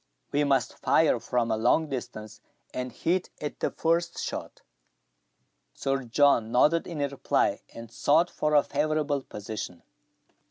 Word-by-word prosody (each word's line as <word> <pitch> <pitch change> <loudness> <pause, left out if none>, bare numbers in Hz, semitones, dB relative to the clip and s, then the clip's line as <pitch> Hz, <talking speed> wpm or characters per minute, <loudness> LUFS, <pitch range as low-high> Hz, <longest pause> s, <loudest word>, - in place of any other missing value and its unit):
We 145 +1 +2
must 135 -3 0
fire - - +3
from 120 -2 -1
a 110 - +1
long 125 +8 +2
distance, 110 -5 -7 0.3
and 125 0 -4
hit 180 +2 -1
at 150 - -5
the - - 0
first 170 +1 0
shot." - - -5 1.1
Sir 135 -1 -1
John 115 -2 +3
nodded 150 +7 +3
in 170 - -6
reply, 140 -1 0
and 115 -1 -9
sought 160 +8 +2
for 150 0 0
a 145 - +6
favourable 150 -1 0
position. 105 -6 -7
140 Hz, 135 wpm, -27 LUFS, 115-155 Hz, 1.1 s, a